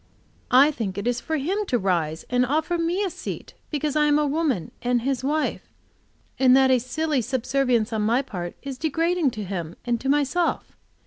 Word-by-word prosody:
I 270 +4 +6
think 205 -9 -4
it 200 - -3
is 245 0 0
for 315 - -2
him 375 +9 -1
to 245 - +2
rise 170 -6 -1
and 250 0 +2
offer 310 +6 0
me 345 +4 0
a 390 - 0
seat, - - -7 0.2
because 295 -1 -2
I 300 0 +4
am 295 0 +4
a 300 - +2
woman 285 - -1
and 245 -1 +1
his 265 -1 -1
wife; 300 +3 -1 0.7
and 260 0 +6
that 265 -1 +5
a 255 - +4
silly 280 +3 -1
subservience 250 -2 0
on 220 - 0
my 235 +6 +2
part 175 -8 -6
is 270 -2 -6
degrading 330 0 +1
to 210 - -3
him 175 -4 -5
and 240 -1 0
to 270 - -2
myself. 295 +5 0
265 Hz, 195 wpm, -24 LUFS, 235-305 Hz, 0.7 s, I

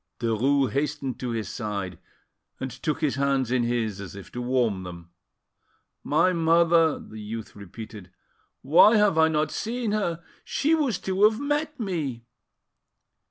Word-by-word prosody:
Derues 125 +3 +1
hastened 140 0 -2
to 125 - -3
his 115 -2 -3
side 100 -7 -4 0.6
and 130 0 -4
took 155 +5 -3
his 140 -5 0
hands 135 -3 +1
in 125 -1 +2
his, 115 -4 -1
as 95 -2 -8
if 100 - -11
to 125 - -5
warm 120 -6 0
them. 85 -1 -10 0.9
"My 165 +5 +3
mother!" 165 -1 +4
the 110 0 -10
youth 110 +1 -7
repeated. 100 0 -10 0.5
"Why 175 - +6
have 205 -6 +3
I 160 - +6
not 155 -1 0
seen 230 0 -2
her? 170 -6 -1 0.2
She 305 +3 0
was 285 - +1
to 190 0 -2
have 220 +1 -6
met 295 +1 -2
me." 150 - -3
140 Hz, 150 wpm, -26 LUFS, 115-170 Hz, 0.9 s, Why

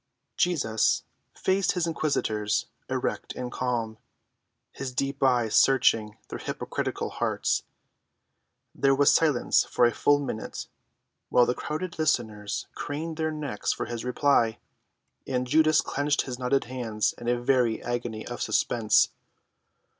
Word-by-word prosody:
Jesus 140 - +1 0.3
faced 190 0 +1
his 180 -2 0
inquisitors, 110 -10 0 0.2
erect - - -2
and 125 -1 -5
calm, 115 -3 -2 0.7
his 135 -2 -5
deep 135 +2 -2
eyes 125 -5 +2
searching 115 -5 +4
their - - -6
hypocritical - - -3
hearts. - - 0 1.1
There 135 0 +3
was 145 +1 +5
silence 150 -6 +3
for 120 - +2
a 120 - +4
full 145 0 +3
minute, 135 -6 -5 0.6
while 125 - +5
the 125 - +1
crowded 165 +6 -5
listeners 110 -9 -1
craned 155 +2 -5
their 160 -1 0
necks 145 -8 -2
for - - -4
his 120 0 -5
reply, 125 -3 +2 0.7
and 125 -1 -1
Judas 155 +3 +4
clenched 145 +1 0
his 125 -2 -6
knotted 130 +2 +1
hands 120 -4 -2
in 120 - -7
a 120 0 +2
very 120 -2 +1
agony 120 -3 -3
of 120 - -6
suspense. 110 -3 +2
125 Hz, 130 wpm, -27 LUFS, 115-145 Hz, 1.1 s, was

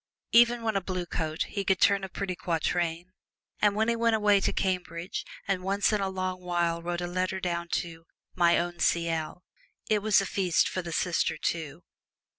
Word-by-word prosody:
Even 235 0 +5
when 220 -2 0
a 195 - +1
Blue 180 -1 -3
Coat 160 -2 -2
he 200 - -4
could 190 -1 +1
turn 200 -1 +4
a 190 - -4
pretty 190 -1 -4
quatrain, 170 0 -1 0.5
and 205 -1 +3
when 220 +1 +1
he 235 - +2
went 230 -1 +2
away 210 -2 +4
to - - +1
Cambridge 180 -2 -2 0.2
and 195 -2 0
once 200 +3 +1
in 210 - +1
a 195 - 0
long 185 -1 -3
while 175 -1 0
wrote 175 +1 -3
a - - -2
letter 185 +2 -2
down 170 -2 -2
to 165 -1 -4 0.3
"My 170 -1 +4
Own 175 0 -2
C.L.," 165 0 0 0.4
it 215 -1 +2
was 215 -1 +4
a 195 - -1
feast 185 -3 +1
for 185 - -3
the 170 -1 -7
sister, 165 -1 0
too. 160 0 -3
180 Hz, 195 wpm, -28 LUFS, 170-200 Hz, 0.5 s, Even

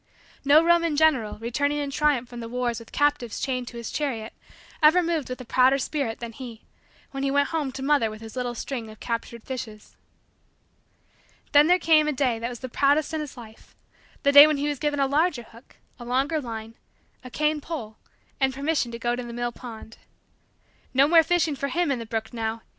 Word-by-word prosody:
No 290 +3 +6
Roman 335 -2 +3
general, 285 -9 +2
returning 285 +6 -1
in 285 -1 -3
triumph 280 -4 +1
from 240 0 -9
the 230 -1 -7
wars 240 -1 -2
with 230 - -14
captives 290 -6 0
chained 255 -2 -2
to 240 - -8
his 235 - -6
chariot, 235 -7 -3 0.5
ever 320 +4 +6
moved 330 -5 -2
with 255 - -5
a - - -9
prouder 260 +3 +4
spirit 270 -4 -3
than 235 -1 -6
he, 230 -2 -10 0.5
when 270 - -5
he 275 - 0
went 285 +1 +2
home 305 -5 -2
to 265 +1 -7
mother 275 -5 +2
with 215 0 -9
his 225 +1 -10
little 245 -1 -3
string 235 -2 -5
of 215 - -13
captured 230 -1 -5
fishes. 225 -5 -8 1.5
Then 295 +1 +6
there 360 +1 +5
came 315 -3 +4
a 300 - 0
day 255 -4 0
that 235 +1 -3
was 240 -2 -9
the 260 - -4
proudest 285 +5 +1
in 315 - -1
his 295 -4 -8
life 220 -2 -14 0.5
the 280 - +4
day 285 +1 +10
when 305 -1 0
he 285 +1 -1
was 290 -2 -2
given 295 -1 -1
a 275 - +3
larger 290 -1 +1
hook, 230 +2 -18 0.2
a - - -8
longer 270 +6 0
line, 225 -3 -7 0.5
a 255 - -9
cane 300 +3 0
pole, 235 -10 -6 0.4
and 265 -1 +1
permission 280 -3 -1
to - - -4
go 240 +1 -1
to 250 - -5
the 240 -1 -8
mill 240 0 -2
pond. 230 -2 -11 1.0
No 275 +2 +5
more 330 +1 +7
fishing 325 -2 +1
for 280 +1 -3
him 335 +2 0
in 260 - -1
the 230 - -7
brook 225 +1 -4
now! 225 -1 -3
265 Hz, 210 wpm, -25 LUFS, 235-295 Hz, 1.5 s, day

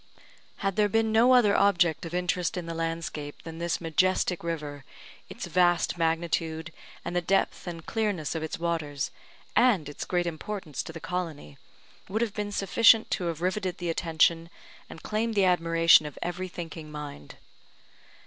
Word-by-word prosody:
Had 195 0 0
there 210 -1 +3
been 225 +1 +2
no 240 +4 +6
other 210 -5 +5
object 175 -5 +3
of 165 - -10
interest 180 0 -1
in 175 - -4
the 165 - -5
landscape 165 -3 -4
than 165 0 -8
this 170 0 -1
majestic 180 +2 +1
river, 150 -4 -4 0.5
its - - -6
vast 175 -2 +2
magnitude, 165 -1 -1 0.3
and 170 - -4
the 175 - +2
depth 195 +1 0
and 165 -2 -6
clearness 205 - -1
of 160 - -3
its 160 - -4
waters, 160 -5 -2 0.4
and 225 - +4
its 145 - -6
great 175 -1 0
importance 170 -2 -4
to - - -8
the 165 - -8
colony, 165 - -5 0.5
would 220 +4 0
have 220 -4 -3
been 205 -1 -3
sufficient 220 +3 +4
to 180 - -1
have 165 -1 -3
riveted 185 -1 -1
the 175 -2 -2
attention, 165 0 +2 0.4
and - - -11
claimed 220 +1 -1
the 200 -2 +4
admiration 165 -3 +5
of 150 - -10
every 180 +2 -3
thinking 165 -3 -8
mind. 145 - -8
170 Hz, 165 wpm, -27 LUFS, 160-190 Hz, 0.5 s, no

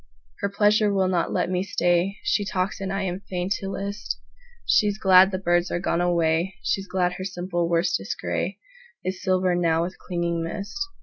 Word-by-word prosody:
Her 200 - -1
pleasure 210 +1 +3
will 190 -2 +2
not 180 -2 0
let - - 0
me 180 0 +1
stay. 180 +1 +1
She 205 - +1
talks 190 -1 -2
and 195 0 -3
I 195 0 -1
am 180 -1 -2
fain 185 -1 -4
to 195 - -5
list:She's 210 - -2
glad 190 -2 +7
the 190 - -2
birds 175 -1 +1
are - - -1
gone 175 -1 0
away, 170 +1 +1
She's 195 0 -1
glad 180 -1 0
her - - -3
simple 175 -2 -2
worsted 170 +1 +1
grayIs - - -2 0.6
silver 185 -1 +2
now 165 -2 +2
with 185 +2 -6
clinging 170 -1 -2
mist. 200 +5 -5
185 Hz, 175 wpm, -25 LUFS, 175-195 Hz, 0.6 s, glad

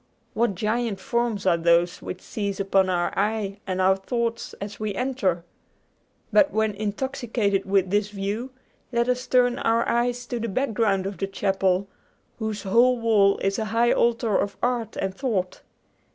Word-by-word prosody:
What 225 -3 +1
giant 215 +1 -1
forms 230 0 -1
are 170 -3 +4
those 170 +1 +2
which 185 - -6
seize 200 -2 -4
upon 195 -1 +2
our 175 -1 0
eye 205 -1 -1
and 185 -1 -2
our 190 +1 +4
thoughts 230 +3 -3
as 200 0 -7
we 215 -2 -3
enter! 245 -10 -1 0.9
But 300 -2 +5
when 220 -1 +1
intoxicated 215 -1 -1
with 190 -1 +2
this 205 0 +1
view, 210 +5 -3 0.4
let 235 0 +1
us 250 0 -1
turn 245 0 +3
our 230 +1 +1
eyes 240 +1 0
to 240 0 -4
the 230 - -3
background 215 -4 0
of 195 0 -5
the 195 - -1
chapel, 195 -1 0 0.5
whose 215 -2 -3
whole 240 +5 +4
wall 210 -4 +4
is 195 +2 0
a 220 - -1
high 230 +3 +2
altar 230 -3 +2
of 200 - -2
art 240 -3 -1
and 190 0 -2
thought. 195 -6 -2
210 Hz, 165 wpm, -24 LUFS, 195-235 Hz, 0.9 s, But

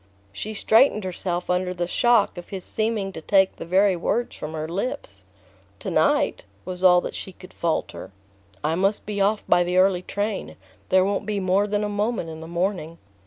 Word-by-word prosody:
She 215 - -5
straightened 220 0 +4
herself 180 -1 -3
under 180 0 0
the 175 0 -1
shock 230 +3 +3
of 175 -1 -9
his 190 -2 -6
seeming 215 -3 -2
to 160 - -8
take 190 +2 +3
the - - -7
very 190 +2 +4
words 235 +7 -1
from 155 +1 -6
her 155 0 -3
lips. 160 - -4 0.5
"To - - -5
night?" - - +2 0.2
was 185 0 -6
all 180 -1 +7
that - - -5
she 190 - -6
could 185 0 -15
falter. 165 -2 -2 0.5
"I 155 +2 +1
must 195 +4 0
be 205 -1 -2
off 205 +2 +2
by 175 - +4
the 180 +1 -1
early 185 -1 +4
train. 205 +2 -3 0.3
There 185 0 +4
won't 200 +1 -1
be 210 -1 -1
more 190 +2 +2
than 205 0 0
a - - 0
moment 205 -4 -2
in 160 - -8
the 160 - -8
morning." 170 -1 -2
190 Hz, 195 wpm, -24 LUFS, 175-205 Hz, 0.5 s, all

